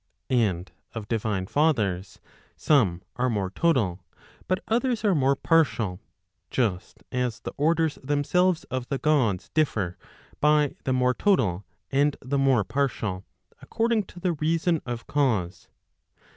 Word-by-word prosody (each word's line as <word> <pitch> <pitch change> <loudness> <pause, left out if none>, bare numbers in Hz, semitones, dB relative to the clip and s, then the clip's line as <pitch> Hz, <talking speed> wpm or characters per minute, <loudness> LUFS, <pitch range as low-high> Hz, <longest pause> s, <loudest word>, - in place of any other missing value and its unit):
And 95 - +1 0.2
of 110 -2 -5
divine 105 -4 -1
lathers, 105 - +1 0.4
some 100 - +2
are 125 +1 +1
more 100 -5 -1
total, 105 - +1 0.4
but 185 +1 -1
others 235 -1 0
are 200 - +4
more 140 -3 +3
partial, 120 - +1 0.5
just 105 -8 -2
as 125 -3 -1
the - - -6
orders 160 +1 +1
themselves 160 +6 +1
of 130 -1 -3
the 140 - 0
Gods, 130 - +1
differ 110 - 0 0.4
by 150 -1 +3
the 130 - +1
more 125 0 +2
total, 105 - +1 0.3
and 140 +1 +2
the 140 +2 -2
more 135 -5 +3
partial, 110 -7 -2 0.4
according 225 -2 0
to 175 - -13
the 175 -1 0
reason 165 +2 0
of 120 -1 -4
cause. 105 -12 0
130 Hz, 130 wpm, -26 LUFS, 105-155 Hz, 0.5 s, are